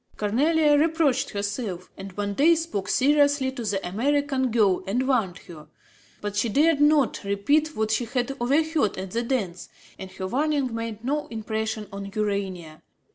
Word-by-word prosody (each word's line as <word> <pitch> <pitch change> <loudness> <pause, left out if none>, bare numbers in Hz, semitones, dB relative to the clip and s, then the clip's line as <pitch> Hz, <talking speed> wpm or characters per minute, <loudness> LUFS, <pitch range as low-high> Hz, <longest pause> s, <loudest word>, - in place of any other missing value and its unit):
Cornélie 290 +8 +3
reproached 310 -4 +2
herself 200 -3 -4
and 195 -1 -9
one 205 0 -2
day 315 +9 +5
spoke 320 - -3
seriously 285 -1 +3
to 255 -3 -6
the 200 -3 -2
American 265 +5 0
girl 205 -6 +2
and 245 +6 0
warned 220 -9 +1
her. 155 -3 -11 0.5
But 205 -1 -4
she 210 +3 +1
dared 295 +5 +3
not 295 -3 +3
repeat 285 +11 +1
what 220 0 -1
she 230 +2 +1
had 250 +2 -2
overheard 290 - +1
at 190 0 -6
the 230 - -1
dance; 210 -8 -3 0.3
and 190 - -7
her 190 0 -5
warning 275 +3 0
made 230 -1 -5
no 290 +4 -1
impression 220 -1 -4
on 200 0 -7
Urania. 190 -6 -3
230 Hz, 160 wpm, -25 LUFS, 200-285 Hz, 0.5 s, day